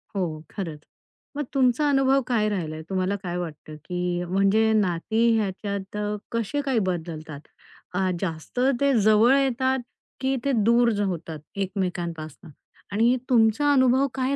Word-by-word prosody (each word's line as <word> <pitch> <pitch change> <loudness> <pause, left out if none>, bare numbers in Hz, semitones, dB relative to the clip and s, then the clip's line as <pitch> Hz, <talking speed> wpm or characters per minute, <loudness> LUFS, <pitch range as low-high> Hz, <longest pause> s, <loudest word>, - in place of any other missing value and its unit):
हो, 165 -5 -2
खरंच. 165 -7 -5 0.6
मग 295 - 0
तुमचा 270 +2 +3
अनुभव 270 0 +3
काय 225 -4 +1
राहिलाय? 160 -6 -3
तुम्हाला 190 +1 0
काय 175 0 -3
वाटतं, 155 -3 -7
की 180 -1 -2
म्हणजे 195 +5 +2
नाती 215 +3 +1
ह्याच्यात 200 0 -3
अ, 210 0 -1 0.2
कसे 230 +5 -1
काय 270 -5 0
बदलतात? 160 -4 -5 0.5
अ, 185 0 +1
जास्त 165 +5 -4 0.2
ते 280 -1 +4
जवळ 215 +5 +5
येतात, 265 0 +1 0.4
की 265 +1 0
ते 280 - +2
दूर 235 0 +4
होतात 165 -4 -4 0.2
एकमेकांपासनं 175 -5 -4 0.4
आणि 230 +5 +3
तुमचा 235 +4 +4
अनुभव 260 +1 +4
काय 265 +1 0
205 Hz, 135 wpm, -25 LUFS, 175-250 Hz, 0.6 s, जवळ